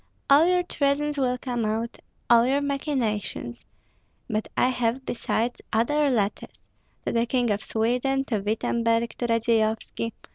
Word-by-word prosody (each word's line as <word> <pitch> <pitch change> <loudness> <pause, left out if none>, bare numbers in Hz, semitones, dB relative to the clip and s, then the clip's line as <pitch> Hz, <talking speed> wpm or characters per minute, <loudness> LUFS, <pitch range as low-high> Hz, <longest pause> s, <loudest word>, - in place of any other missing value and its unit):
All 300 +4 +7
your 360 0 +3
treasons 295 -2 0
will 250 -2 +1
come 245 -2 -3
out, 220 +2 -2 0.3
all 235 -1 +6
your 275 +2 +2
machinations. 250 - -2 0.6
But 215 0 -2
I 250 - +4
have, 250 +1 -1
besides, 240 0 -2
other 290 +6 +2
letters, 210 -5 -1 0.5
to - - 0
the 235 0 +1
King 245 -2 +1
of 205 +1 -1
Sweden, 250 +4 0
to 220 -5 -1
Wittemberg, 230 +2 0
to 240 - 0
Radzeyovski. 230 0 0
235 Hz, 140 wpm, -25 LUFS, 225-270 Hz, 0.6 s, All